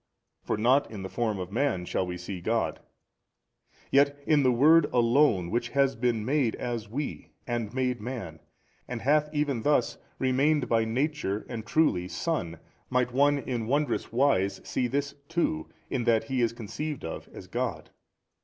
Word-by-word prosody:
for - - -2
not 125 +6 +3
in 105 -3 -7
the 95 - -5
form 110 -2 -1
of 90 0 -5
man 115 -6 0
shall 90 - -1
we 90 0 -4
see 90 0 -6
God: 115 +5 0 1.1
yet 140 +1 +4
in 150 -2 +4
the 130 -2 +4
Word 150 +6 +6
Alone 120 - +3
Which 120 0 -1
has 135 +1 +2
been 115 -2 0
made 135 -3 +1
as 115 -3 -4
we 140 +6 -5
and 120 -3 -2
made 125 -2 -1
Man 105 -10 -6 0.5
and 125 -2 -5
hath 150 +3 +3
even 145 -4 0
|295 - - -8
thus 145 -5 +2 0.2
remained 135 +2 +2
by 115 -1 +2
Nature 125 -3 -1
and 115 -3 -5
truly 115 - +2
Son, 90 - -2 0.3
might 125 -1 +1
one 145 +2 +4
in 120 -5 -3
wondrous 145 +4 0
wise 115 -7 +2
see 125 - -1
this 140 +3 -2 0.2
too, 165 - -1 0.2
in 125 -3 -1
that 115 -2 +3
He 130 +2 -1
is 115 - +2
conceived 120 - -5
of 80 - -6
as - - -10
God. - - -3
125 Hz, 170 wpm, -28 LUFS, 110-140 Hz, 1.1 s, Word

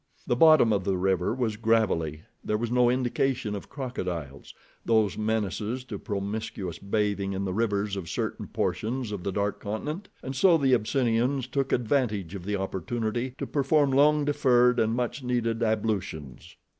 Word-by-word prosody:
The 120 - +1
bottom 155 -5 +6
of 100 -2 0
the 95 -1 0
river 95 0 +1
was 115 -3 -1
gravelly, 100 -9 +1 0.2
there 105 - 0
was 115 +1 -3
no 125 -1 +4
indication 125 -2 0
of 100 - -7
crocodiles, 90 - -5 0.3
those 110 -4 +2
menaces 110 +2 -2
to 130 - -7
promiscuous 100 -4 -4
bathing 100 -1 -1
in 95 +1 -2
the 95 - -2
rivers 105 -1 0
of 90 -4 -5
certain - - -3
portions 120 0 -2
of 100 -3 -4
the 100 - -2
dark 100 +1 -1
continent, 150 - -5
and 135 +1 -5
so 170 +5 +5
the 135 -4 +2
Abyssinians 125 +2 +1
took 135 +1 -2
advantage 110 - 0
of 95 -3 -7
the 105 +1 -1
opportunity 110 +6 -3
to - - -3
perform 145 0 +2
long 145 +2 +4
deferred, 125 -4 +3
and 110 +1 +2
much 125 +3 -2
needed, 120 -2 -1
ablutions. 105 - -2
110 Hz, 160 wpm, -27 LUFS, 100-125 Hz, 0.3 s, bottom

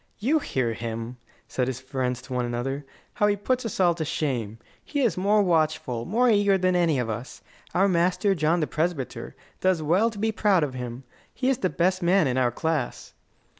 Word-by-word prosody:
"You 280 +9 +2
hear 125 - -1
him!" 115 +2 -5 0.3
said 125 -1 -1
his 130 -1 -3
friends 130 -2 -3
one 125 -1 -1
to 120 - -2
another. 135 +4 -3 0.3
"How 210 -3 +2
he 205 - +2
puts 245 +4 -1
us 205 - -6
all 175 -2 +5
to 165 -1 -3
shame! 120 -8 -2 0.3
He 290 -2 -2
is 240 -5 +2
more 205 +3 +3
watchful, 155 -9 0
more 240 +6 +2
eager, 205 -3 +4
than 185 -1 +1
any 170 -5 +2
of 125 -2 -1
us. 115 +3 -6 0.3
Our 195 +2 +4
master, 185 +2 +2
John 165 0 +1
the - - +2
Presbyter, 155 -3 -3 0.2
does 185 -4 +1
well 185 +9 +3
to 220 - -10
be 220 +2 0
proud 205 -5 +2
of 140 -3 -2
him. 125 0 -6 0.3
He 255 0 -1
is 265 -2 +1
the 185 - +1
best 185 +2 +1
man 180 +1 +4
in 130 -1 +1
our 125 -1 +3
class." 155 +2 -3
165 Hz, 205 wpm, -25 LUFS, 130-200 Hz, 0.3 s, all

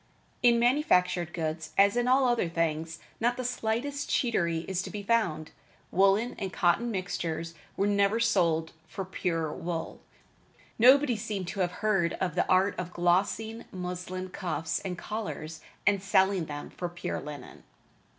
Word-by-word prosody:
In 240 -1 +5
manufactured 180 - +2
goods, 160 -1 -4
as 200 +2 +5
in 245 0 +1
all 260 +1 +4
other 240 -8 +1
things, 165 0 -1 0.2
not 240 +2 +1
the 255 - -3
slightest 250 +4 -2
cheatery 170 -9 +1
is 190 -1 -1
to - - -6
be 205 -1 -6
found. 180 -8 0 0.4
Woolen 195 +6 +3
and 195 -3 -3
cotton 175 +8 +2
mixtures 170 -4 -3 0.2
were 200 - +2
never 200 +2 +2
sold 170 -8 +2 0.2
for 195 +3 -5
pure 165 -4 -2
wool. 170 -1 -5 0.8
Nobody 260 +2 +6
seemed 205 -3 -4
to 195 - -6
have 180 -2 +1
heard 190 -6 +2
of 180 -3 -2
the 180 - 0
art 190 +2 +4
of 180 0 -5
glossing 200 +6 0
muslin 180 0 -5
cuffs 165 -3 -2
and 180 -2 -5
collars 165 -7 -5 0.2
and 200 -2 +3
selling 190 -2 +2
them 145 -1 -7
for 175 - -4
pure 175 0 -4
linen. 145 -2 -9
185 Hz, 150 wpm, -29 LUFS, 170-220 Hz, 0.8 s, Nobody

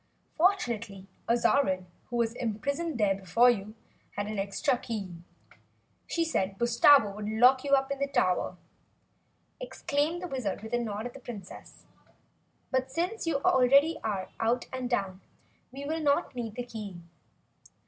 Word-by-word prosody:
"Fortunately 235 - 0 0.2
Azarine, 235 -5 +2 0.2
who 240 - -7
was 230 -1 +1
imprisoned 275 +7 -2
there 205 -3 +3
before 195 +6 +4
you, 215 -1 -5 0.4
had 205 - -1
an 210 -1 -4
extra 200 +7 0
key. 215 -7 -5 0.9
She 335 -1 0
said 195 -11 -1
Bustabo 235 0 +5
would 210 0 -4
lock 250 +4 +5
you 280 -1 0
up 270 0 +3
in 280 - -3
the 280 - 0
tower!" 185 -7 0 1.0
exclaimed 325 -7 -2
the - - -3
Wizard 245 - -3
with 220 - -8
a 240 - +2
nod 215 -2 -4
at 245 - -6
the - - -10
Princess. 215 -7 -10 0.9
"But 260 0 0
since 345 +8 -2
you 280 -4 0
already 275 +5 +4
are 200 -4 -2
out 235 +2 +1
and 255 -1 -3
down, 195 -5 -2 0.5
we'll 280 +4 -4
not 295 +1 +1
need 230 -3 -5
the 245 - -4
key. 210 -6 -7
240 Hz, 150 wpm, -29 LUFS, 210-280 Hz, 1.0 s, Bustabo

